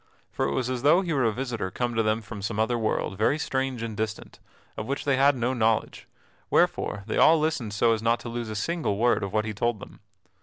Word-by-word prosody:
For -, -, -1 dB
it 70 Hz, -, -2 dB
was 125 Hz, -, -1 dB
as 130 Hz, -1 st, -2 dB
though 150 Hz, +7 st, +5 dB
he 175 Hz, -4 st, -2 dB
were 135 Hz, -4 st, +2 dB
a 115 Hz, -, +3 dB
visitor 115 Hz, -4 st, -3 dB
come 120 Hz, +5 st, -2 dB
to 115 Hz, -, +1 dB
them 110 Hz, +1 st, 0 dB
from 105 Hz, -2 st, -8 dB
some 105 Hz, +2 st, -3 dB
other 110 Hz, +2 st, +1 dB
world, 110 Hz, -3 st, -2 dB
very 125 Hz, +7 st, +2 dB
strange 130 Hz, -5 st, -2 dB
and 115 Hz, -2 st, -4 dB
distant, 110 Hz, +1 st, -5 dB, 0.4 s
of 110 Hz, -, -5 dB
which 140 Hz, -, -3 dB
they 140 Hz, -2 st, +3 dB
had 140 Hz, +2 st, +4 dB
no 125 Hz, +1 st, 0 dB
knowledge, 110 Hz, -3 st, 0 dB, 0.4 s
wherefore 100 Hz, -, +1 dB
they 110 Hz, -, -3 dB
all 160 Hz, 0 st, +6 dB
listened 155 Hz, -8 st, -1 dB
so 115 Hz, +2 st, +3 dB
as 110 Hz, -, -2 dB
not 115 Hz, +1 st, +2 dB
to 120 Hz, -, -6 dB
lose 120 Hz, -1 st, -4 dB
a 110 Hz, -, -5 dB
single 130 Hz, -2 st, -1 dB
word 120 Hz, +3 st, +2 dB
of 100 Hz, -, -3 dB
what 110 Hz, +1 st, 0 dB
he 110 Hz, -, -3 dB
told 120 Hz, +1 st, -1 dB
them. -, -, -12 dB
115 Hz, 245 wpm, -26 LUFS, 110-130 Hz, 0.4 s, all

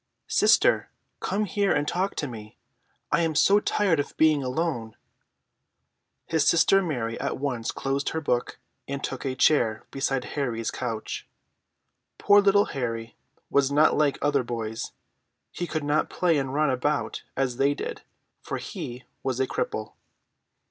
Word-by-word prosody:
"Sister, -, -, +4 dB, 0.3 s
come 205 Hz, +3 st, -1 dB
here 200 Hz, -1 st, +1 dB
and 145 Hz, 0 st, +1 dB
talk 190 Hz, +3 st, -1 dB
to 150 Hz, -, -2 dB
me. 110 Hz, -3 st, -10 dB, 0.5 s
I -, -, +3 dB
am 165 Hz, -2 st, 0 dB
so 200 Hz, +6 st, +5 dB
tired 195 Hz, -6 st, +1 dB
of 145 Hz, -, -4 dB
being 155 Hz, -2 st, +4 dB
alone." 125 Hz, -4 st, -2 dB, 1.3 s
His 160 Hz, -2 st, +1 dB
sister 195 Hz, +4 st, +5 dB
Mary 120 Hz, -10 st, -3 dB
at -, -, -2 dB
once 130 Hz, -5 st, -2 dB
closed 135 Hz, +1 st, -1 dB
her 160 Hz, -, -2 dB
book, 125 Hz, -5 st, -1 dB, 0.3 s
and 140 Hz, 0 st, -4 dB
took 135 Hz, 0 st, -4 dB
a 130 Hz, -1 st, -1 dB
chair 115 Hz, -6 st, +2 dB
beside 135 Hz, -1 st, -1 dB
Harry's 120 Hz, -6 st, -2 dB
couch. 115 Hz, -4 st, -4 dB, 0.9 s
Poor 205 Hz, 0 st, +6 dB
little 200 Hz, +1 st, +4 dB
Harry 115 Hz, -4 st, -3 dB, 0.4 s
was 140 Hz, -1 st, +3 dB
not 150 Hz, +2 st, +4 dB
like 145 Hz, -2 st, +2 dB
other 145 Hz, -1 st, +3 dB
boys. 115 Hz, -2 st, -4 dB, 0.6 s
He 175 Hz, -, -4 dB
could 155 Hz, -3 st, -3 dB
not 145 Hz, +1 st, +1 dB
play 170 Hz, -4 st, +2 dB
and 135 Hz, -1 st, -3 dB
run 150 Hz, 0 st, +2 dB
about 145 Hz, +4 st, -1 dB, 0.2 s
as 130 Hz, -2 st, 0 dB
they 140 Hz, +2 st, +2 dB
did, -, -, -5 dB, 0.4 s
for -, -, -4 dB
he 125 Hz, +1 st, -7 dB, 0.2 s
was 130 Hz, -2 st, -2 dB
a 130 Hz, -, +3 dB
cripple. 110 Hz, -3 st, -3 dB
140 Hz, 150 wpm, -26 LUFS, 125-160 Hz, 1.3 s, Poor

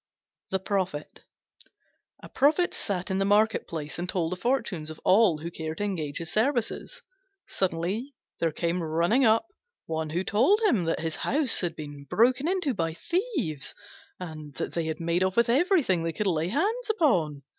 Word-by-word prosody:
THE 190 Hz, -, +1 dB
PROPHET 185 Hz, -5 st, -3 dB, 1.0 s
A -, -, -9 dB
Prophet 305 Hz, +6 st, +2 dB
sat 190 Hz, -2 st, -3 dB
in 190 Hz, -, 0 dB
the -, -, +2 dB
market 210 Hz, +3 st, +3 dB
place 155 Hz, -1 st, -5 dB
and 180 Hz, +1 st, -4 dB
told 170 Hz, -3 st, 0 dB
the -, -, -1 dB
fortunes 205 Hz, -, -1 dB
of 155 Hz, -, -8 dB
all 190 Hz, -4 st, +5 dB
who 165 Hz, +3 st, -6 dB
cared 160 Hz, -1 st, -5 dB
to -, -, -2 dB
engage 160 Hz, -8 st, -2 dB
his 170 Hz, 0 st, -4 dB
services. 235 Hz, +2 st, -1 dB, 0.4 s
Suddenly 190 Hz, +9 st, -2 dB, 0.2 s
there 165 Hz, -1 st, +1 dB
came 170 Hz, +3 st, -1 dB
running 170 Hz, +11 st, +2 dB
up 225 Hz, +6 st, +4 dB, 0.4 s
one 160 Hz, -1 st, -3 dB
who 175 Hz, +4 st, -1 dB
told 255 Hz, -, +3 dB
him 240 Hz, -, +3 dB
that 165 Hz, -, -1 dB
his 160 Hz, -1 st, -2 dB
house 285 Hz, -4 st, +1 dB
had 170 Hz, -3 st, -2 dB
been 145 Hz, -2 st, -8 dB
broken 250 Hz, -, +3 dB
into 360 Hz, -7 st, 0 dB
by 165 Hz, -5 st, -2 dB
thieves, 330 Hz, -, -2 dB, 0.4 s
and 155 Hz, -5 st, -8 dB
that -, -, -3 dB
they 170 Hz, -1 st, -1 dB
had 160 Hz, 0 st, -3 dB
made 170 Hz, +1 st, 0 dB
off 185 Hz, +2 st, 0 dB
with 235 Hz, 0 st, +4 dB
everything 275 Hz, -, +3 dB
they 165 Hz, 0 st, -2 dB
could 210 Hz, -, -2 dB
lay 165 Hz, -4 st, +1 dB
hands 430 Hz, -, 0 dB
on. 160 Hz, -, +2 dB
185 Hz, 175 wpm, -27 LUFS, 165-240 Hz, 1.0 s, all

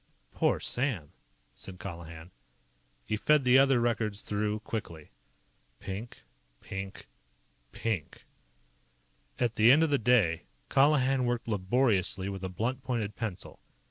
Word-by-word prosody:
"Poor -, -, +2 dB
Sam!" 120 Hz, -, -2 dB, 0.4 s
said 90 Hz, +9 st, -8 dB
Colihan. 85 Hz, -2 st, -9 dB, 0.7 s
He 110 Hz, -, -1 dB
fed 150 Hz, +5 st, +3 dB
the 125 Hz, +1 st, +7 dB
other 135 Hz, -2 st, +4 dB
records 110 Hz, -3 st, 0 dB
through 105 Hz, +1 st, -1 dB
quickly. 85 Hz, -, -6 dB, 0.7 s
Pink. 100 Hz, +5 st, -7 dB, 0.4 s
Pink. 95 Hz, 0 st, -7 dB, 0.7 s
PINK. 100 Hz, -11 st, -4 dB, 1.1 s
At 120 Hz, -2 st, 0 dB
the 110 Hz, +3 st, +7 dB
end 155 Hz, +4 st, +6 dB
of 160 Hz, -, +1 dB
the 140 Hz, -, +3 dB
day, 105 Hz, -9 st, +2 dB, 0.2 s
Colihan 135 Hz, -2 st, +3 dB
worked 120 Hz, -1 st, -1 dB
laboriously 100 Hz, -2 st, +1 dB
with 95 Hz, -1 st, -6 dB
a 95 Hz, -, -2 dB
blunt 120 Hz, +8 st, -2 dB
pointed 115 Hz, -6 st, -3 dB
pencil. 110 Hz, -6 st, -5 dB
110 Hz, 120 wpm, -30 LUFS, 95-125 Hz, 1.1 s, the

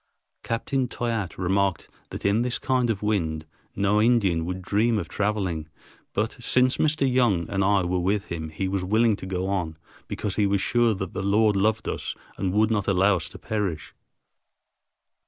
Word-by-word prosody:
Captain 125 Hz, +3 st, -1 dB
Toyatte 115 Hz, -7 st, -3 dB
remarked 95 Hz, 0 st, 0 dB, 0.2 s
that -, -, -7 dB
in 100 Hz, +3 st, +3 dB
this 125 Hz, 0 st, 0 dB
kind 125 Hz, -2 st, 0 dB
of 105 Hz, -2 st, -2 dB
wind 80 Hz, -7 st, -1 dB, 0.3 s
no 100 Hz, +2 st, +2 dB
Indian 100 Hz, -8 st, +2 dB
would 90 Hz, +1 st, -3 dB
dream 110 Hz, +5 st, +2 dB
of 90 Hz, -6 st, -3 dB
traveling, 95 Hz, -7 st, -2 dB, 0.4 s
but 110 Hz, +2 st, -1 dB
since 125 Hz, +2 st, +3 dB
Mr. 155 Hz, -2 st, +2 dB
Young 120 Hz, -10 st, +2 dB
and 100 Hz, 0 st, +1 dB
I 100 Hz, 0 st, +3 dB
were 90 Hz, +1 st, 0 dB
with 100 Hz, +3 st, 0 dB
him 80 Hz, -2 st, -5 dB
he 80 Hz, +5 st, -3 dB
was 95 Hz, -1 st, -1 dB
willing 110 Hz, +3 st, +3 dB
to 95 Hz, -, -8 dB
go 95 Hz, 0 st, -2 dB
on, 90 Hz, -5 st, -2 dB, 0.3 s
because 100 Hz, -2 st, -3 dB
he 105 Hz, -2 st, +3 dB
was 100 Hz, 0 st, +1 dB
sure 120 Hz, +2 st, +2 dB
that 95 Hz, -1 st, -5 dB
the -, -, -3 dB
Lord 105 Hz, +2 st, +3 dB
loved 110 Hz, +3 st, +1 dB
us -, -, -3 dB, 0.2 s
and 95 Hz, -, -1 dB
would 110 Hz, +3 st, +2 dB
not 105 Hz, -3 st, 0 dB
allow 95 Hz, 0 st, +3 dB
us 80 Hz, -1 st, -5 dB
to -, -, -10 dB
perish. 100 Hz, -8 st, -3 dB
100 Hz, 180 wpm, -25 LUFS, 90-110 Hz, 0.4 s, in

